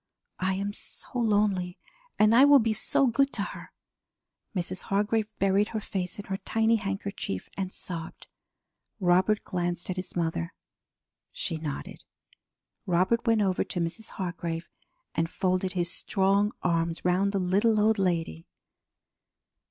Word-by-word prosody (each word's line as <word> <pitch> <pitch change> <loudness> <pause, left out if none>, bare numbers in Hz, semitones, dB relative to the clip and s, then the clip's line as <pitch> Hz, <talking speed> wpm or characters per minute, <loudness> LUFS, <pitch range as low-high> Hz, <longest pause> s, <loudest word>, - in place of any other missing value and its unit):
I 190 +1 +1
am 200 +1 -2
so - - -6
lonely, 205 -5 +1 0.4
and 215 +1 +5
I 250 +4 +8
will 285 0 +8
be 225 -3 +2
so 245 +5 +2
good 275 +3 +2
to - - 0
her!" - - -8 0.8
Mrs. 185 0 -3
Hargrave 210 +2 +1
buried 195 +1 +3
her 220 - -3
face 185 -3 -4
in 205 - -7
her 195 - -3
tiny 225 +3 +2
handkerchief 195 - -4
and 190 -1 -3
sobbed. 165 -4 -6 0.7
Robert 185 +3 +3
glanced 175 -1 -2
at 185 - -5
his 185 - -5
mother. 160 - -2 0.8
She 165 - -3
nodded. 155 -3 -6 0.8
Robert 185 +7 +2
went 225 -2 +4
over 190 -2 +1
to 180 - -3
Mrs. 175 +7 -3
Hargrave 170 -2 -4 0.4
and 165 0 0
folded 185 +1 0
his 175 -2 +1
strong 200 +1 +2
arms 165 -1 0
round 185 +3 +2
the 200 - -1
little 200 +4 +2
old 215 0 +3
lady. 165 - -1
190 Hz, 140 wpm, -28 LUFS, 175-210 Hz, 0.8 s, I